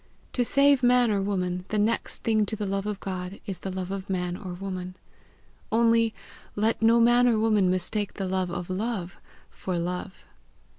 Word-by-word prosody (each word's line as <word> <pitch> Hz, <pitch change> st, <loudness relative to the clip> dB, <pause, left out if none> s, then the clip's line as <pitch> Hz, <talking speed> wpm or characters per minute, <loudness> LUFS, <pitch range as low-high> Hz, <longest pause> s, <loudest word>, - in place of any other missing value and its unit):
To 245 Hz, -, +2 dB
save 275 Hz, +2 st, +4 dB
man 245 Hz, -2 st, +4 dB
or 200 Hz, -1 st, +1 dB
woman, 180 Hz, -2 st, -1 dB
the 215 Hz, -, -1 dB
next 215 Hz, +3 st, 0 dB
thing 220 Hz, -2 st, +2 dB
to 220 Hz, -, -2 dB
the 210 Hz, -1 st, -3 dB
love 195 Hz, +1 st, -2 dB
of 210 Hz, -2 st, -3 dB
God 185 Hz, 0 st, -5 dB
is 195 Hz, -3 st, -5 dB
the 195 Hz, -, -5 dB
love 185 Hz, 0 st, -4 dB
of 195 Hz, 0 st, -5 dB
man 180 Hz, -2 st, -1 dB
or 185 Hz, -1 st, -7 dB
woman; 185 Hz, -1 st, -5 dB, 0.8 s
only 230 Hz, 0 st, +3 dB, 0.4 s
let 220 Hz, +3 st, +1 dB
no 230 Hz, +1 st, +5 dB
man 240 Hz, +1 st, +5 dB
or 235 Hz, -2 st, +3 dB
woman 215 Hz, -4 st, +3 dB
mistake 185 Hz, +3 st, -2 dB
the 195 Hz, -2 st, -3 dB
love 185 Hz, -1 st, -1 dB
of 175 Hz, 0 st, -4 dB
love 195 Hz, -2 st, -3 dB, 0.3 s
for 185 Hz, -2 st, -4 dB
love! 180 Hz, +2 st, -4 dB
195 Hz, 185 wpm, -26 LUFS, 185-225 Hz, 0.8 s, no